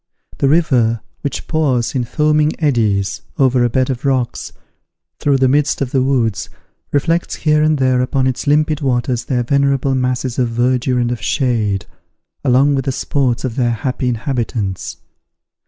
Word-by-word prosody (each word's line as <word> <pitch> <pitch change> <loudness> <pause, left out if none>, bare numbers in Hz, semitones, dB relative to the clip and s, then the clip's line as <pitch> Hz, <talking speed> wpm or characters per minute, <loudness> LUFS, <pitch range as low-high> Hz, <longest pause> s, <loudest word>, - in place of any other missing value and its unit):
The 135 - +2
river, 125 -8 +2 0.2
which 140 - -4
pours, 135 -7 0
in 125 -3 -1
foaming 150 +4 +1
eddies, 110 - 0 0.2
over 130 -2 +3
a 120 - +2
bed 130 +2 +1
of 125 -2 -5
rocks, 130 -3 -1 0.7
through 140 -2 +2
the 130 0 +3
midst 145 +2 +1
of 135 -3 -2
the 135 - +2
woods, 125 -6 0 0.4
reflects 165 +4 0
here 150 -1 +2
and 155 0 +2
there 130 -2 +2
upon 130 +1 0
its 130 +2 -2
limpid 150 +1 +2
waters 125 -2 -1
their 125 -3 0
venerable 140 +1 +1
masses 125 -1 -1
of 125 -2 +1
verdure 125 +2 0
and 120 0 0
of 120 - -4
shade, 110 -8 0 0.6
along 135 +2 +3
with 135 -1 -1
the 135 - 0
sports 130 -2 -1
of 120 -3 -4
their 120 -2 +2
happy 125 +2 -2
inhabitants. 115 -5 -3
130 Hz, 160 wpm, -17 LUFS, 120-140 Hz, 0.7 s, over